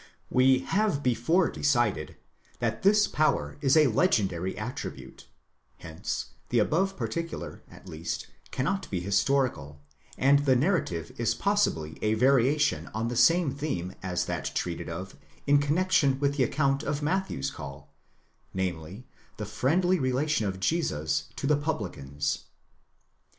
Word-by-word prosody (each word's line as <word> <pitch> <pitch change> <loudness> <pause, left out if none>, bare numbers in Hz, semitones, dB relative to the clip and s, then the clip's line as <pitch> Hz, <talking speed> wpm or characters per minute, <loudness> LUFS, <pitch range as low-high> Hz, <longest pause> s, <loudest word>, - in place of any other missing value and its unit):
We 130 0 +4
have 195 -1 0
before 130 +9 +2
decided 120 - 0 0.4
that 110 -2 -2
this 210 +2 +5
power 155 -1 0
is 135 +1 +4
a 155 - +7
legendary 100 - +1
attribute; 120 +6 -7 0.5
hence 80 0 -5 0.2
the 120 - +1
above 190 - +1
particular, 170 0 -4
at - - -15
least, 80 +2 -4 0.2
cannot 190 +9 -2
be 95 - -2
historical, 100 - 0 0.4
and 140 +2 +5
the 135 -2 +3
narrative 125 - 0
is 115 -1 +1
possibly 140 - 0
a 110 0 +2
variation 135 +4 +3
on 115 +1 -1
the 120 - -3
same 165 +2 +4
theme 135 - -3
as 90 -1 -1
that - - -3
treated 85 -1 -3
of 90 +4 -7 0.3
in 145 0 +5
connexion 145 -2 +2
with 140 0 +1
the 135 -3 +3
account 140 +1 +1
of 145 0 -3
Matthew's 185 - -1
call, 70 0 -10 0.6
namely, 95 +4 -4 0.3
the 105 - -4
fiendly 170 - +1
relation 130 -2 +1
of 95 -1 -4
Jesus 80 - 0
to - - -4
the 150 +2 +4
publicans. 85 - -3
130 Hz, 135 wpm, -28 LUFS, 95-150 Hz, 0.6 s, a